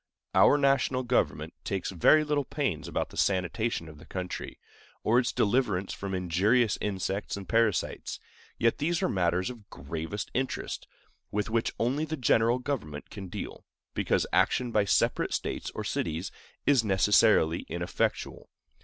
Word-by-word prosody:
Our 145 - +6
national 135 -2 +2
government 80 - 0
takes 95 -1 -2
very 125 - +5
little 145 -1 0
pains 135 - -2
about - - -2
the - - -11
sanitation 95 0 0
of 75 -1 -12
the - - -15
country, 90 -1 -5 0.5
or 120 +3 +4
its 125 - 0
deliverance 100 -4 +1
from 100 -1 -4
injurious 100 +6 +2
insects 100 0 -2
and 95 -2 -8
parasites; 115 0 0 0.4
yet 115 0 +2
these 165 +3 0
are - - +3
matters 90 +2 +1
of 115 -5 -14
gravest 80 +6 -5
interest, 130 +1 -3 0.4
with 105 +2 -2
which 115 0 +1
only 130 +6 +1
the 160 0 -4
general 115 -1 +3
government 120 - -4
can 100 -2 -7
deal, - - -7 0.3
because - - +1
action 125 -2 +2
by 105 -2 +3
separate - - +2
States - - -3
or - - -3
cities 80 +3 -2 0.3
is 135 -5 +4
necessarily 95 -4 +4
ineffectual. 85 +1 -2
105 Hz, 145 wpm, -29 LUFS, 90-125 Hz, 0.5 s, Our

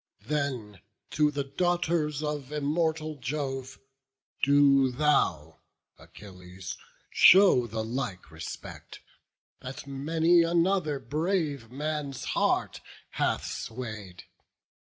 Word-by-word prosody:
Then 130 -10 -3 0.3
to 150 -1 +3
the 145 -1 -2
daughters 165 -1 0
of 150 -2 -4
immortal 155 +1 -1
Jove, 135 0 -4 0.6
Do 140 -1 +5
thou, 120 - +1 0.4
Achilles, 90 -2 -10 0.4
show 185 -10 +6
the 110 0 -3
like 110 - -4
respect, 80 0 -9 0.6
That 130 +1 -8
many 160 +5 +2
another 170 -2 +1
brave 150 - -2
man's 145 0 -4
heart - - 0 0.3
hath - - -1
sway'd. 110 -6 -7
140 Hz, 90 wpm, -28 LUFS, 120-155 Hz, 0.6 s, show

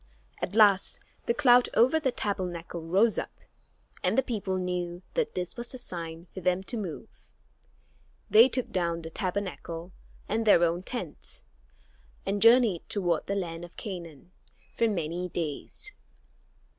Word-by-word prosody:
At - - -3
last 205 -3 +4 0.3
the 235 - +3
cloud 245 -1 +5
over 260 +7 +5
the 270 -5 0
Tabernacle 180 -6 -3
rose 195 +7 +3
up, - - -8 0.6
and - - +1
the 265 - +4
people 200 -6 -2
knew 180 -1 -3
that 485 -3 -1
this 180 -1 -3
was 240 0 -4
the 255 - -6
sign 170 -7 -5
for 190 - -6
them 180 +1 +1
to 240 - -4
move. 210 0 -7 1.0
They 225 +4 +7
took 255 0 -2
down 170 -2 -1
the 160 - -7
Tabernacle 180 -2 -4 0.4
and 225 +2 0
their 205 -5 +6
own 170 +1 +1
tents, 185 -6 -6 0.8
and 200 +1 -1
journeyed 230 -6 +5
toward 175 -6 0
the 200 - -1
land 170 -3 -4
of 175 - -12
Canaan 175 - -7 0.4
for 230 - +3
many 175 -2 -2
days. 160 -4 -5
185 Hz, 145 wpm, -28 LUFS, 170-225 Hz, 1.0 s, They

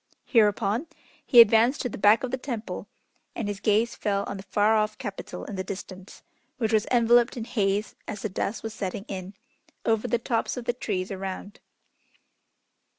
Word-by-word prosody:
Hereupon, 220 +3 +2 0.4
he 245 - +6
advanced 230 +4 +4
to 250 - -2
the - - -7
back 210 +6 +5
of 255 - -2
the 260 - -1
temple, 240 -4 -5 0.5
and 225 - -3
his 205 -1 -4
gaze 220 +3 +2
fell 200 -1 -1
on 200 - -5
the - - -7
far 210 +2 +3
off 215 0 0
Capital 200 -1 -6
in 200 - -6
the 190 - -2
distance, 190 0 -9 0.3
which 225 -3 -1
was 215 -1 +2
enveloped 240 +1 +4
in 230 - -3
haze 205 -2 0
as 210 -2 -6
the 215 - -1
dusk 200 +3 -3
was 225 -1 -5
setting 195 -1 -4
in, 190 0 -6 0.5
over 225 -1 +1
the 240 - +1
tops 230 +1 -1
of 245 - -5
the 240 - +1
trees 200 -6 -3
around. 195 +1 -6
215 Hz, 180 wpm, -26 LUFS, 200-235 Hz, 0.5 s, he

